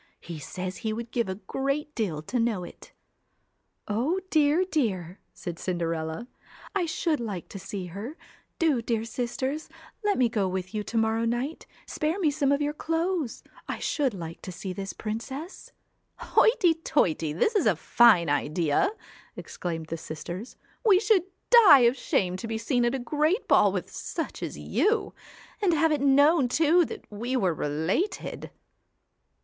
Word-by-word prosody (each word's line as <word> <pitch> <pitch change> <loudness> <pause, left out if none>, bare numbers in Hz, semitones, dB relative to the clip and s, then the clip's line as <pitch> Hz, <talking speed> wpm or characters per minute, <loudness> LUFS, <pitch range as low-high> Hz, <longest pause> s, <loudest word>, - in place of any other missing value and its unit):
He 165 -2 -8
says 185 +5 -5
he 220 -2 -2
would 230 +1 -6
give 235 -5 0
a 190 - -2
great 275 +9 -3
deal 175 - -2
to 245 +10 -2
know 225 -6 0
it.' 175 - -12 1.0
'O 255 - 0
dear, 310 +4 +4
dear!' 195 - -1
said 175 -4 -7
Cinderella, 165 +3 -3 0.5
'I 380 -4 0
should 320 -1 0
like 205 -7 -5
to 195 - -8
see 190 0 -5
her; 205 - -7 0.4
do, 305 -8 +2
dear 230 -1 -1
sisters, 260 +5 -3 0.3
let 415 -1 +2
me 250 - +4
go 210 -4 0
with 185 0 -4
you 215 - -1
to - - -8
29 - - -4
CINDER, 225 - +4
morrow 225 +1 0 0.2
night, 320 - -12 0.2
spare 310 +4 -1
me 315 -6 +2
some 280 -1 +1
of 285 +1 +2
your 295 0 -1
clothes. 325 -3 -2 0.2
1 - - -2
ELLA - - -11
should 275 -6 0
like 165 -2 -7
to 185 - -7
see 185 +1 -6
this 195 +1 -5
princess.' 265 - -6 0.5
'Hoity 380 -7 +4
toity! 180 - 0
this 180 - +1
is 380 - +3
a 200 - +4
fine 175 0 +5
idea!' 150 - +1 0.5
exclaimed 165 -2 -5
the 165 +1 -5
sisters. 170 +7 -7
' - - -34
We 405 -5 +6
should 410 -4 +3 0.3
die 400 - +9
of 240 +1 +4
shame 185 -7 0
to 225 - -6
be 225 0 -2
seen 240 +2 +1
at 240 +2 +1
a - - 0
great 305 - 0
ball - - +5
with - - -4
such - - -5
as - - -5
you 440 +2 0 0.5
and 360 -5 +3
have 320 +1 +3
it 300 -3 +1
known 285 +1 +5
too 325 +6 +4
that 445 - -8
we 235 +5 -3
were 185 -8 +2
related.' 160 - -2
235 Hz, 175 wpm, -27 LUFS, 185-310 Hz, 1.0 s, die